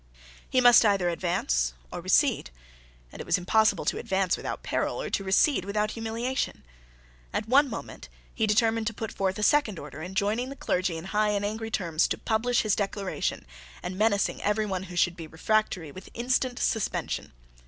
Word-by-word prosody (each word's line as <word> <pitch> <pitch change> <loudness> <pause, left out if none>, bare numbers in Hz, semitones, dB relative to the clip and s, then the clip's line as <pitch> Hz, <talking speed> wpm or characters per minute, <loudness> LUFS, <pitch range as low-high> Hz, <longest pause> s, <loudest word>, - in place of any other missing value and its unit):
He 255 - +3
must 245 -1 +8
either 200 -5 +3
advance 60 - 0 0.2
or - - -5
recede: - - +2 0.6
and - - -11
it - - -6
was 180 - +3
impossible 215 +5 +2
to - - 0
advance 190 -1 +1
without - - -5
peril, - - -1
or - - -4
to 195 - 0
recede 190 - +3
without 210 +2 -1
humiliation. 230 +3 -3 0.7
At - - -2
one 275 +4 +5
moment - - -8 0.2
he 220 -2 0
determined 225 +1 +2
to 230 - -2
put 220 -1 -5
forth 190 0 -1
a 210 - -2
second 230 - +3
order 150 +1 -8
enjoining 200 +8 -1
the 275 - -7
clergy 180 -9 -1
in 160 - -7
high 210 0 +3
and 205 -1 0
angry 220 +2 -3
terms 170 -7 +1
to - - -2
publish 240 +2 +1
his 215 -2 +2
Declaration, 200 -1 -2 0.4
and 180 - -4
menacing 205 0 +1
every 210 +1 +1
one 190 -3 -2
who 180 - -8
should 175 0 +2
be 165 -2 -8
refractory 175 -1 0
with 185 +5 -11
instant 250 +1 0
suspension. 220 -3 -1
210 Hz, 180 wpm, -27 LUFS, 185-225 Hz, 0.7 s, must